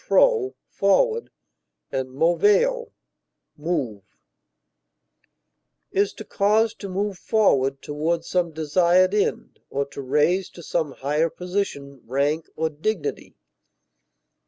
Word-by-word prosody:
pro, 475 Hz, -6 st, +3 dB
forward, 470 Hz, -2 st, +2 dB, 0.6 s
and 130 Hz, -1 st, -2 dB
moveo, 205 Hz, -, +2 dB, 0.6 s
move) 145 Hz, -, -2 dB, 1.9 s
is 200 Hz, +1 st, +2 dB
to 215 Hz, -, -10 dB
cause 215 Hz, +3 st, +2 dB
to 200 Hz, -3 st, -8 dB
move 195 Hz, 0 st, -2 dB
forward 135 Hz, -, +2 dB
toward 160 Hz, +3 st, -1 dB
some 175 Hz, -2 st, 0 dB
desired 170 Hz, +4 st, +3 dB
end 210 Hz, -, -1 dB
or 140 Hz, +1 st, -1 dB
to 140 Hz, 0 st, -8 dB
raise 150 Hz, +8 st, +1 dB
to 170 Hz, -, -13 dB
some 160 Hz, -2 st, -1 dB
higher 150 Hz, +5 st, 0 dB
position, 160 Hz, -8 st, -4 dB
rank, 145 Hz, +5 st, 0 dB
or 160 Hz, +1 st, 0 dB
dignity. 215 Hz, -, -3 dB
170 Hz, 105 wpm, -24 LUFS, 145-205 Hz, 1.9 s, pro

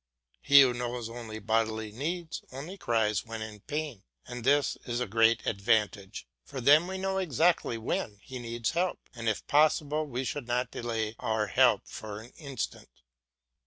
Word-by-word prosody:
He 140 Hz, -1 st, +8 dB
who 130 Hz, -2 st, +5 dB
knows 120 Hz, -1 st, -4 dB
only 115 Hz, -2 st, -7 dB
bodily 110 Hz, 0 st, 0 dB
needs, 165 Hz, +8 st, -4 dB
only 145 Hz, +9 st, -7 dB
cries 110 Hz, -, +1 dB
when 115 Hz, -1 st, -6 dB
in 110 Hz, -1 st, -8 dB
pain; 145 Hz, -3 st, -4 dB, 0.2 s
and 125 Hz, -1 st, -7 dB
this 145 Hz, +3 st, +3 dB
is 120 Hz, 0 st, -1 dB
a 125 Hz, -, 0 dB
great 115 Hz, +2 st, +3 dB
advantage, 105 Hz, -1 st, 0 dB, 0.2 s
for 140 Hz, -, -7 dB
then 145 Hz, +7 st, +6 dB
we 190 Hz, 0 st, -4 dB
know 190 Hz, 0 st, -1 dB
exactly 165 Hz, -6 st, +2 dB
when 110 Hz, -2 st, -2 dB
he 130 Hz, -1 st, -7 dB
needs 115 Hz, -1 st, -2 dB
help, 175 Hz, +2 st, 0 dB
and 115 Hz, -3 st, -2 dB
if 110 Hz, -, -2 dB
possible 150 Hz, 0 st, +3 dB
we 130 Hz, -1 st, -3 dB
should 130 Hz, -1 st, -4 dB
not 125 Hz, +1 st, 0 dB
delay 115 Hz, -2 st, -3 dB
our 110 Hz, -1 st, 0 dB
help 100 Hz, -, +4 dB
for 105 Hz, -1 st, -7 dB
an 115 Hz, +3 st, -12 dB
instant. 140 Hz, -4 st, -5 dB
120 Hz, 165 wpm, -29 LUFS, 110-145 Hz, 0.2 s, He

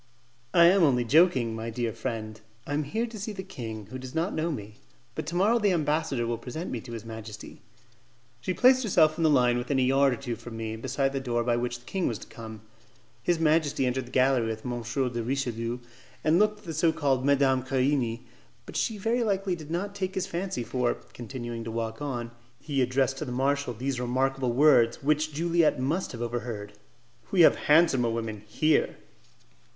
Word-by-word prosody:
"I 170 Hz, -, +8 dB
am 185 Hz, +3 st, +6 dB
only 125 Hz, -7 st, +3 dB
joking, 130 Hz, -5 st, +4 dB
my 115 Hz, +1 st, -4 dB
dear 115 Hz, -1 st, -2 dB
friend; 110 Hz, -3 st, -5 dB, 0.2 s
I 145 Hz, -, -4 dB
am 150 Hz, 0 st, 0 dB
here 220 Hz, +11 st, -1 dB
to 225 Hz, -2 st, -8 dB
see 210 Hz, +2 st, -4 dB
the 190 Hz, -1 st, -6 dB
king, 110 Hz, -, -7 dB
who 130 Hz, -, -5 dB
does 130 Hz, +2 st, -9 dB
not 165 Hz, +4 st, 0 dB
know 160 Hz, +2 st, -1 dB
me; 105 Hz, -6 st, -7 dB, 0.4 s
but 140 Hz, -, -5 dB
to 170 Hz, -, -4 dB
morrow 210 Hz, +6 st, +3 dB
the 205 Hz, -3 st, +2 dB
ambassador 150 Hz, -6 st, 0 dB
will 115 Hz, 0 st, -2 dB
present 155 Hz, +8 st, -6 dB
me 120 Hz, -, -3 dB
to 120 Hz, -, -9 dB
his 115 Hz, -1 st, -7 dB
majesty." 110 Hz, -2 st, -9 dB, 0.8 s
She 185 Hz, +9 st, -3 dB
placed 255 Hz, +1 st, +5 dB
herself 165 Hz, -8 st, +3 dB
in -, -, +1 dB
the 160 Hz, -, +5 dB
line 125 Hz, -4 st, +3 dB
within 135 Hz, +3 st, -1 dB
a 130 Hz, -, +3 dB
yard 135 Hz, +1 st, +4 dB
or -, -, -1 dB
two 120 Hz, -2 st, -4 dB
from 115 Hz, 0 st, -9 dB
me, 110 Hz, -1 st, -4 dB
beside 135 Hz, +4 st, -1 dB
the 135 Hz, -, -1 dB
door 120 Hz, -3 st, -1 dB
by 120 Hz, 0 st, +1 dB
which 120 Hz, 0 st, -2 dB
the 120 Hz, -, -22 dB
king 185 Hz, +7 st, -1 dB
was 115 Hz, -, -2 dB
to -, -, -11 dB
come. 110 Hz, -2 st, -10 dB, 0.6 s
His 170 Hz, +8 st, +1 dB
majesty 155 Hz, -4 st, +2 dB
entered 125 Hz, 0 st, -1 dB
the -, -, -13 dB
gallery 130 Hz, -3 st, +3 dB
with 110 Hz, -1 st, -5 dB
M. 120 Hz, -1 st, -3 dB
de 120 Hz, 0 st, -2 dB
Richelieu, 120 Hz, -2 st, -2 dB, 0.5 s
and 155 Hz, +3 st, +4 dB
looked 210 Hz, 0 st, +3 dB
at -, -, -21 dB
the 165 Hz, -, -5 dB
so 160 Hz, +2 st, +3 dB
called 140 Hz, -5 st, 0 dB
Madame 135 Hz, -2 st, +3 dB
Querini. 130 Hz, -3 st, 0 dB, 0.4 s
But -, -, -11 dB
she 220 Hz, -, 0 dB
very 230 Hz, +4 st, 0 dB
likely 195 Hz, -3 st, 0 dB
did 155 Hz, -3 st, -10 dB
not 190 Hz, +5 st, -2 dB
take 190 Hz, -1 st, -3 dB
his 190 Hz, -, 0 dB
fancy, 180 Hz, -8 st, -3 dB
for, 125 Hz, 0 st, 0 dB, 0.2 s
continuing 120 Hz, -1 st, -6 dB
to 115 Hz, -, -6 dB
walk 115 Hz, +1 st, -4 dB
on, 120 Hz, -5 st, -3 dB, 0.3 s
he 140 Hz, -3 st, -1 dB
addressed 135 Hz, +1 st, +1 dB
to -, -, -3 dB
the 125 Hz, -, -6 dB
marshal 135 Hz, 0 st, 0 dB
these 130 Hz, +2 st, -2 dB
remarkable 130 Hz, +1 st, 0 dB
words, 125 Hz, -3 st, +4 dB
which 155 Hz, +2 st, +1 dB
Juliette 165 Hz, -1 st, +2 dB
must 155 Hz, +9 st, -1 dB
have 120 Hz, -1 st, -5 dB
overheard, 115 Hz, -4 st, -4 dB, 0.6 s
"We 185 Hz, -, +3 dB
have 165 Hz, -, +7 dB
handsomer 150 Hz, -6 st, +5 dB
women 115 Hz, -2 st, -3 dB
here." 155 Hz, +8 st, +1 dB
135 Hz, 205 wpm, -27 LUFS, 120-160 Hz, 0.8 s, I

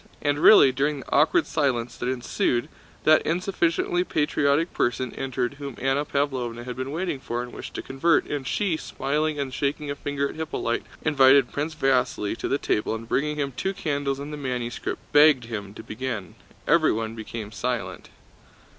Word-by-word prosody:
And 145 Hz, 0 st, 0 dB
really, 155 Hz, -6 st, +8 dB
during 140 Hz, +2 st, -1 dB
the -, -, -13 dB
awkward 150 Hz, +3 st, +4 dB
silence 125 Hz, -6 st, -1 dB
that 125 Hz, -, -2 dB
ensued, 125 Hz, +1 st, -1 dB, 0.3 s
that 155 Hz, 0 st, +6 dB
insufficiently 175 Hz, 0 st, 0 dB
patriotic 150 Hz, 0 st, +1 dB
person 120 Hz, +1 st, -1 dB
entered 130 Hz, 0 st, -3 dB
whom 140 Hz, -3 st, -6 dB
Anna 135 Hz, +3 st, +1 dB
Pávlovna 125 Hz, -5 st, -2 dB
had 125 Hz, -1 st, -5 dB
been 130 Hz, +1 st, -4 dB
waiting 160 Hz, -1 st, -2 dB
for 120 Hz, -2 st, -3 dB
and 125 Hz, -, -10 dB
wished -, -, -8 dB
to -, -, -4 dB
convert, 150 Hz, +6 st, +2 dB
and 140 Hz, -3 st, -4 dB
she, 190 Hz, -2 st, 0 dB
smiling 150 Hz, +1 st, -2 dB
and 135 Hz, -2 st, -3 dB
shaking 145 Hz, +1 st, -2 dB
a -, -, -3 dB
finger 140 Hz, 0 st, -2 dB
at -, -, -8 dB
Hippolyte, 155 Hz, -7 st, -3 dB, 0.2 s
invited 135 Hz, -3 st, +5 dB
Prince 155 Hz, +2 st, -3 dB
Vasíli 125 Hz, -7 st, +1 dB
to -, -, -3 dB
the 140 Hz, -, +1 dB
table 110 Hz, -4 st, -1 dB
and 115 Hz, 0 st, -8 dB
bringing 150 Hz, +5 st, 0 dB
him 140 Hz, -2 st, -2 dB
two 190 Hz, +10 st, -3 dB
candles 145 Hz, -5 st, -1 dB
and 145 Hz, +2 st, -7 dB
the -, -, -5 dB
manuscript 125 Hz, -4 st, -3 dB
begged 145 Hz, -3 st, +6 dB
him 105 Hz, -4 st, -6 dB
to -, -, -9 dB
begin. 110 Hz, -4 st, -5 dB, 0.3 s
Everyone 110 Hz, 0 st, +2 dB
became 110 Hz, -1 st, -7 dB
silent. 120 Hz, +1 st, -4 dB
135 Hz, 170 wpm, -25 LUFS, 125-150 Hz, 0.3 s, really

